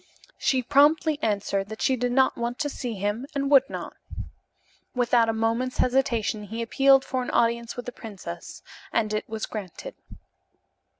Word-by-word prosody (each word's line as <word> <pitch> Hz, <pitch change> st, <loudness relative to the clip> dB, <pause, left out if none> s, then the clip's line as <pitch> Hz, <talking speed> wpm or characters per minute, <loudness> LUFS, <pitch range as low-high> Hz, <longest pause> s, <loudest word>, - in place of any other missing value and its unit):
She 260 Hz, -2 st, +1 dB
promptly 295 Hz, +3 st, +4 dB
answered 200 Hz, -2 st, -1 dB
that 220 Hz, -, -5 dB
she 265 Hz, -1 st, +3 dB
did 245 Hz, 0 st, -1 dB
not 260 Hz, +1 st, +3 dB
want 235 Hz, +1 st, -3 dB
to 290 Hz, -, -1 dB
see 245 Hz, -5 st, -5 dB
him 205 Hz, +6 st, -2 dB
and 280 Hz, 0 st, -1 dB
would 270 Hz, -1 st, +6 dB
not. -, -, -6 dB, 1.0 s
Without 240 Hz, -2 st, +3 dB
a -, -, +4 dB
moment's 225 Hz, +3 st, -1 dB
hesitation 235 Hz, -5 st, +1 dB
he 225 Hz, +3 st, -4 dB
appealed 270 Hz, +3 st, +4 dB
for 260 Hz, -1 st, -2 dB
an 250 Hz, -, -4 dB
audience 235 Hz, 0 st, +1 dB
with 245 Hz, -, -6 dB
the 245 Hz, -, -5 dB
princess, 190 Hz, -7 st, -9 dB, 0.3 s
and 215 Hz, -2 st, 0 dB
it 215 Hz, -, -3 dB
was 220 Hz, -1 st, -3 dB
granted. 215 Hz, -, -7 dB
235 Hz, 165 wpm, -26 LUFS, 220-265 Hz, 1.0 s, would